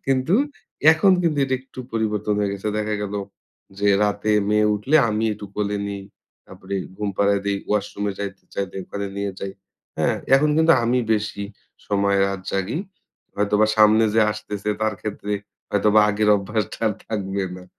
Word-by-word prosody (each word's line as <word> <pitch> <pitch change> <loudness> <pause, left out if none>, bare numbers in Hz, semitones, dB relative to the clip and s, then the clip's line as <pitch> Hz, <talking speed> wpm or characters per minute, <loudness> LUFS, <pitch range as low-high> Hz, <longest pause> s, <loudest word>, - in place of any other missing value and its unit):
কিন্তু 135 +6 +2 0.6
এখন 185 +4 +4
কিন্তু 155 -4 +1
এটা 130 - 0
একটু 130 - -18
পরিবর্তন 105 -2 0
হয়ে 100 -1 0
গেছে। 100 +1 -4
দেখা 105 0 -1
গেলো 100 0 -3 0.6
যে 100 0 +2
রাতে 105 +1 +1 0.2
মেয়ে 105 0 +3
উঠলে 130 +10 +2
আমি 110 +1 0
একটু 105 -1 -8
কোলে 105 0 -1
নিই। 100 -1 -5 0.4
তারপরে 100 - -8 0.2
ঘুম 105 -1 -2
পাড়ায় 100 0 +2
দেই। 100 - +1
ওয়াশরুমে 105 -1 -1
যাইতে 100 -1 -5
চাইলে 100 -1 -3
ওখানে 100 0 -5
নিয়ে 100 0 -2
যাই। 100 0 -4 0.5
হ্যাঁ? - - +2 0.2
এখন 150 +2 +4
কিন্তু 160 +1 +5
আমি 125 +2 +2
বেশি 105 -1 -2 0.4
সময় 100 -1 +2
রাত 100 -1 -3
জাগি। 100 - -1 0.6
হয়তোবা 105 +1 +2
সামনে 110 +1 +6
যে 115 - +5
আসতেছে 105 -1 -6
তার 110 -1 +1
ক্ষেত্রে 105 -1 -4 0.4
হয়তোবা 105 +1 +4
আগের 105 +1 +1
অভ্যাসটা 105 0 -3
আর - - 0 0.2
থাকবে 100 -2 -2
না। 90 - -11
105 Hz, 160 wpm, -22 LUFS, 100-110 Hz, 0.6 s, সামনে